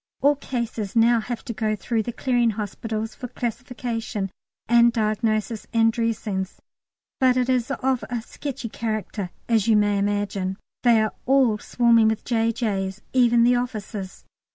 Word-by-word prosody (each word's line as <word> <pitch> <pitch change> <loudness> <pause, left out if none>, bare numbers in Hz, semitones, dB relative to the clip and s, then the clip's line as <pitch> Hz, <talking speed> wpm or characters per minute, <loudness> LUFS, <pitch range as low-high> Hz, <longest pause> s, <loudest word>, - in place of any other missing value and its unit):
All 285 +1 +5
cases 235 -6 -4
now 230 +1 +5
have 235 +2 -5
to 235 - -4
go 215 +1 0
through 225 +2 -1
the 240 - -4
Clearing 240 -1 +1
Hospitals 220 +1 -4
for 250 - -7
classification 235 -4 -4 0.4
and 235 +1 +6
diagnosis 215 -1 -1
and 225 -1 +4
dressings, 215 -5 -2 0.6
but 255 -2 +4
it 250 0 +1
is 255 -1 +1
of 265 -2 0
a 245 -1 -2
sketchy 275 -1 -6
character, 215 -4 -3 0.2
as 225 -3 +2
you 220 -2 +5
may 205 -1 +2
imagine. 200 -2 -1 0.2
They 230 -3 +5
are 215 - -2
all 260 -5 +4
swarming 235 -1 +4
with 220 -1 -1
J.J.'s, 225 -4 -1
even 240 -2 +5
the 245 +1 +4
officers. 210 -5 -5
230 Hz, 150 wpm, -24 LUFS, 215-240 Hz, 0.6 s, and